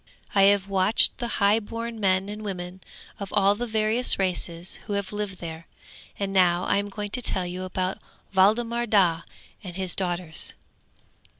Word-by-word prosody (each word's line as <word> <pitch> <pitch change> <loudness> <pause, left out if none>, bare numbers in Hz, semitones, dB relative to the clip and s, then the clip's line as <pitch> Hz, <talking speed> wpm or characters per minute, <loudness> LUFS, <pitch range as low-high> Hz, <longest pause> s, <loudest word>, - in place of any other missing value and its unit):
'I 195 - +4
have 195 0 +4
watched 195 +5 +3
the 240 - -2
highborn 225 +3 0
men 190 -1 +1
and 210 +1 -7
women 185 -2 -6 0.4
of 200 -1 -6
all 200 -1 +4
the 240 +4 -4
various 220 +2 +2
races 180 -2 -2
who 205 - -3
have 200 0 -3
lived 205 -2 -4
there, 165 -1 -8 0.5
and 195 -1 -3
now 180 -2 +3
I - - +1
am 205 0 -2
going 205 +1 -5
to 250 - -3
tell 185 -5 +2
you 180 +1 -5
about 185 0 -3 0.3
Waldemar 230 +5 +2
Daa 180 -6 +2 0.4
and 180 -3 -8
his 185 -2 -2
daughters! 175 -3 0
195 Hz, 165 wpm, -25 LUFS, 185-210 Hz, 0.5 s, I